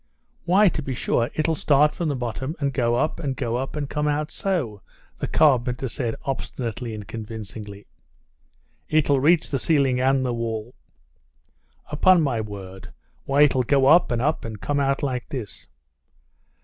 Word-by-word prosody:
"Why, 195 +4 +5
to 165 - 0
be 135 -3 -4
sure, 120 0 0
it'll 155 +1 +1
start 150 0 +3
from 170 -3 -2
the 145 - -1
bottom 125 +4 -4
and 140 -2 -1
go 120 -3 +1
up 155 +6 0
and 135 -4 -2
go 120 -3 -2
up, 135 +1 -4
and 145 -2 -3
come 150 +1 -2
out 150 +1 -1
so," 135 - -2 0.4
the - - -2
carpenter 130 -4 +2
said 120 -2 -3
obstinately 120 -4 -4
and 105 -2 -8
convincingly. 105 -2 -8 1.0
"It'll 145 -3 +3
reach 155 +4 +3
the 135 - 0
ceiling 135 -4 +2
and 135 0 +2
the 125 - -1
wall." 115 0 -4 1.2
"Upon 180 +4 +5
my 120 -6 0
word! 95 -3 -9 0.4
Why, 140 +2 +4
it'll 130 -3 +3
go 135 +2 +2
up, 160 +6 +6
and 120 0 0
up, 155 +3 0
and 110 -2 -7
come 145 +10 -1
out 135 0 0
like 125 -3 -2
this." 120 -8 -7
130 Hz, 165 wpm, -23 LUFS, 115-150 Hz, 1.2 s, up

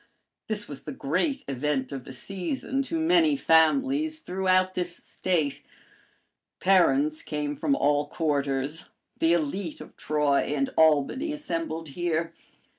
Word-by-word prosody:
This 210 -1 -2
was 140 -2 -8
the 150 - -5
great 185 - -1
event 135 0 -1
of 135 -2 -6
the - - -9
season 195 - -3
to 325 +4 -2
many 325 -2 +4
families 275 - +3
throughout 185 - +1
this 175 -1 -3
State. 160 -7 -2 1.0
Parents 155 -5 +3
came 150 -1 -3
from 280 - +1
all 145 - +2
quarters; 145 -1 -1 0.3
the 165 +1 +4
élite 170 +1 -2
of - - -12
Troy 150 -2 +1 0.2
and 135 -1 0
Albany 160 - +3
assembled 165 - -4
here. 165 +1 -2
165 Hz, 125 wpm, -27 LUFS, 145-200 Hz, 1.0 s, many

